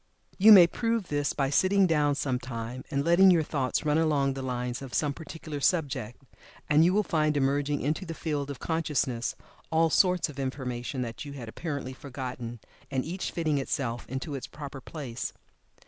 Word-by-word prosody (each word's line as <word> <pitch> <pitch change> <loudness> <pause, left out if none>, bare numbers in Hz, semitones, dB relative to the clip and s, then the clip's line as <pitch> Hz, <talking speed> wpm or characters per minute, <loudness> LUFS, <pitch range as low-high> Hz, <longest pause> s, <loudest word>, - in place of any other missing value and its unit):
You 215 +3 +8
may 190 -4 +11
prove 230 +2 -1
this 145 -1 0
by 135 -1 -1
sitting 190 +5 +4
down 150 -4 +2
some 130 -3 -1
time 125 0 -6
and 140 -1 -1
letting 175 +3 +6
your 170 -3 +5
thoughts 140 -2 -1
run 150 +1 +3
along 145 -4 +2
the 135 - -5
line 125 -1 -2
of 135 -2 -6
some 145 -2 +1
particular 155 -1 -7
subject, 135 -8 -1 0.4
and 150 +1 +5
you 175 - +4
will 210 +2 +2
find 155 -4 +1
emerging 140 +1 +1
into 155 +7 -1
the 165 -3 -6
field 145 -4 -3
of 140 - -5
consciousness 145 -7 -1 0.4
all 160 0 +3
sorts 180 -3 +3
of 145 -3 -9
information 130 -1 -3
that 115 -2 -6
you 145 -1 -8
had 125 -5 -8
apparently 140 +1 -5
forgotten, 125 -3 -6 0.3
and 130 -2 -1
each 180 +4 -3
fitting 155 -4 0
itself 130 -4 -3
into 135 +4 -4
its 135 - -5
proper 145 -2 -8
place. 130 -5 -6
145 Hz, 180 wpm, -28 LUFS, 130-160 Hz, 0.4 s, may